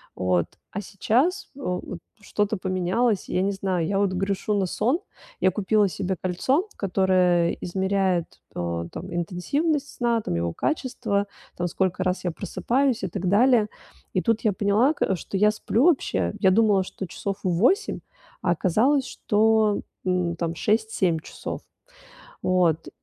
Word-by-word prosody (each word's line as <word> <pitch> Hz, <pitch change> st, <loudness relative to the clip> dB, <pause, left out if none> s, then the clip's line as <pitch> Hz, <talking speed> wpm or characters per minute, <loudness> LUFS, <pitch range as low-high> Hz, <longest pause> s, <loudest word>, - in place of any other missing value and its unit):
Вот. 90 Hz, -2 st, +1 dB, 0.3 s
А 205 Hz, -, -4 dB
сейчас, 250 Hz, -, 0 dB
э, -, -, -13 dB
вот 180 Hz, -3 st, -4 dB, 0.2 s
что-то 210 Hz, 0 st, -1 dB
поменялось. 185 Hz, +4 st, 0 dB
И -, -, -4 dB
я 180 Hz, -, +3 dB
не 195 Hz, +1 st, +1 dB
знаю. 190 Hz, -3 st, -1 dB
Я 195 Hz, -, 0 dB
вот 200 Hz, -2 st, +2 dB
грешу 195 Hz, +3 st, -1 dB
на 195 Hz, -, +1 dB
сон. 245 Hz, -, 0 dB, 0.4 s
Я 185 Hz, -, +3 dB
купила 210 Hz, +1 st, +2 dB
себе 190 Hz, 0 st, -2 dB
кольцо, 260 Hz, -, +1 dB
которое 185 Hz, -3 st, +2 dB
измеряет, 190 Hz, -1 st, 0 dB, 0.3 s
э, 85 Hz, -1 st, -2 dB
там, 180 Hz, +3 st, -7 dB
интенсивность 280 Hz, -, -1 dB
сна, 235 Hz, -2 st, 0 dB
там, 145 Hz, -, -3 dB
его 85 Hz, 0 st, -1 dB
качество, 205 Hz, -, -1 dB, 0.3 s
там, 175 Hz, -, -1 dB
сколько 185 Hz, +1 st, -1 dB
раз 185 Hz, 0 st, -1 dB
я 180 Hz, -, 0 dB
просыпаюсь 250 Hz, +7 st, 0 dB
и -, -, 0 dB
так 185 Hz, +1 st, -4 dB
далее. 225 Hz, +2 st, +4 dB, 0.5 s
И 185 Hz, -, +1 dB
тут 225 Hz, +1 st, +1 dB
я 215 Hz, -, +2 dB
поняла, 210 Hz, +9 st, +3 dB
к 195 Hz, -, 0 dB
что 190 Hz, +3 st, -5 dB
я 210 Hz, +2 st, +5 dB
сплю 225 Hz, +4 st, +1 dB
вообще, 265 Hz, -, +2 dB
я 190 Hz, -, +4 dB
думала, 205 Hz, -1 st, +4 dB
что 190 Hz, -, -7 dB
часов 195 Hz, +3 st, -4 dB
8, 225 Hz, -, +2 dB, 0.4 s
а 175 Hz, -, +1 dB
оказалось, 235 Hz, -, +2 dB
что, 220 Hz, -2 st, +2 dB, 0.2 s
м, 180 Hz, -2 st, 0 dB
там 170 Hz, 0 st, -3 dB
6-7 210 Hz, -5 st, +1 dB
часов. -, -, -7 dB, 0.8 s
Вот. 175 Hz, -3 st, +2 dB
195 Hz, 155 wpm, -25 LUFS, 180-220 Hz, 0.8 s, я